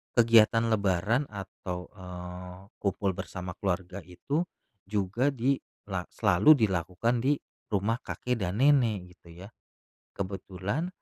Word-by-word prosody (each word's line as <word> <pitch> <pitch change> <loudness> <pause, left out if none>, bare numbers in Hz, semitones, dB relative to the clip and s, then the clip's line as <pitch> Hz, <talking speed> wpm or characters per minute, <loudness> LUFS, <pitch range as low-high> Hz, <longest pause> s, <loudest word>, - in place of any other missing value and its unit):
kegiatan 115 -1 +5
lebaran 105 +5 +2
atau, 95 -4 -7
eee, 90 -1 -8 0.2
kumpul 100 -1 0
bersama 90 -1 -6
keluarga 95 -1 -2
itu 140 - -2 0.4
juga 105 +7 0
dilak 115 -7 -2
selalu 100 - +6
dilakukan, 110 - +1
di 135 +5 +3 0.4
rumah 105 +4 +1
kakek 125 -1 -3
dan 95 +8 -2
nenek, 115 -10 +3
gitu 85 -2 -16
ya. 100 - -9 0.7
Kebetulan 100 - -3
100 Hz, 110 wpm, -29 LUFS, 90-115 Hz, 0.7 s, selalu